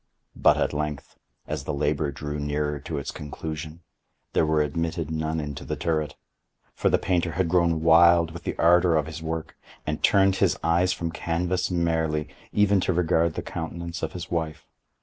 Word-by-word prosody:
But - - +4
at - - 0
length, 75 -1 -4 0.3
as 75 -3 -4
the 75 - -2
labor 75 0 0
drew 75 +1 -5
nearer 75 0 -1
to 70 - -5
its 70 - -4
conclusion, 80 +2 -7 0.5
there 80 - +3
were 75 -1 +3
admitted 80 +1 -2
none 80 0 -1
into 75 -2 -5
the - - -3
turret; 75 -5 -1 0.6
for - - +1
the - - +4
painter 85 -2 0
had 90 0 +1
grown 85 -2 +2
wild 85 0 +6
with 85 +1 -8
the - - -4
ardor 85 0 +5
of 75 -2 +2
his 80 0 -7
work, 80 0 -4 0.3
and 75 0 -3
turned 95 -1 +4
his - - +2
eyes 85 +2 +3
from 85 -2 -3
canvas 85 +2 -1
merely, 80 -3 0 0.2
even 105 -1 +3
to 95 - 0
regard 85 -1 +2
the - - -3
countenance 85 +1 -5
of 80 - -3
his 90 - -7
wife. 80 -2 -3
80 Hz, 180 wpm, -25 LUFS, 75-85 Hz, 0.6 s, wild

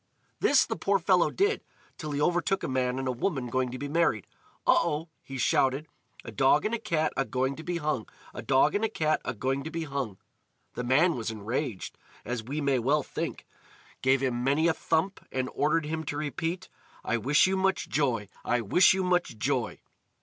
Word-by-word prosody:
This 285 - +4
the 225 - -3
poor 200 -2 +1
fellow 180 -1 +3
did, 405 +3 +1 0.3
till 155 - -6
he 145 -1 -2
overtook 175 +5 +1
a - - -1
man 130 -1 0
and 135 0 -2
a - - +1
woman 125 -2 -2
going 130 0 0
to 125 - -6
be 145 - -4
married. 145 - +1 0.4
"Oh! - - +5
oh!" 155 +3 -2
he 135 - -8
shouted: 135 +3 +2 0.4
"A 115 - -6
dog 135 +7 +3
and 215 - 0
a 235 - 0
cat 160 -7 0
agoing 130 0 0
to - - -7
be 175 +1 -2
hung! 150 -8 -2 0.3
A - - -6
dog 135 -1 +3
and 205 - 0
a 225 - +2
cat 155 -7 0
agoing 130 +4 -2
to 160 - -5
be 165 0 -3
hung!" 135 -9 -4 0.6
The 125 - -4
man 150 +8 +3
was 115 -2 -3
enraged, 110 +1 -4 0.3
as 120 0 -3
we 140 +6 -4
may 140 -3 +2
well 140 +5 +2
think, - - -5 0.6
gave 130 0 +3
him 125 -2 0
many 145 +5 +3
a 165 - +3
thump, 165 +5 -1
and 130 -1 -2
ordered 155 +2 +1
him 160 +1 -3
to 145 - -3
repeat: 165 +5 -3 0.4
"I 120 - +1
wish 140 +6 +4
you 190 0 +1
much 190 0 +1
joy! 120 -8 0 0.2
I 120 0 +1
wish 180 - +5
you 190 - 0
much 180 -9 0
joy!" 125 0 -1
145 Hz, 200 wpm, -28 LUFS, 130-165 Hz, 0.6 s, Oh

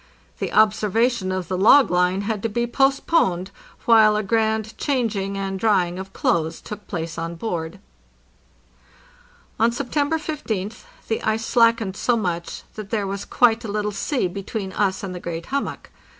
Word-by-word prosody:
The - - -3
observation 215 0 +2
of 185 -2 -3
the 185 +1 -2
log 230 +3 +6
line 180 +2 +2
had 210 0 -2
to 225 - -1
be 235 +3 0
post 270 +3 +1
poned, 190 - +1 0.3
while 220 -2 +6
a 210 - 0
grand 220 0 0
changing 220 -8 -1
and 195 -1 -3
drying 185 -4 +2
of 190 0 -7
clothes 160 -3 0
took 210 -1 -9
place 165 -3 -4
on 165 +1 -4
board. 170 -2 -4 1.8
On 230 +1 +4
September 285 +5 -1
15th 225 -10 -4 0.2
the 225 - -1
ice 220 +1 0
slackened 230 -4 +3
so 240 +3 +1
much 175 -5 -3
that 215 -2 -8
there 210 -2 -1
was 200 +1 -4
quite 235 -1 +3
a 215 - -4
little 210 0 -1
sea 205 +3 -1
between 195 +2 -5
us 195 -2 0
and 190 -2 -4
the 180 - -6
great 170 -1 -5
hummock. 280 +1 -4
210 Hz, 165 wpm, -22 LUFS, 185-230 Hz, 1.8 s, log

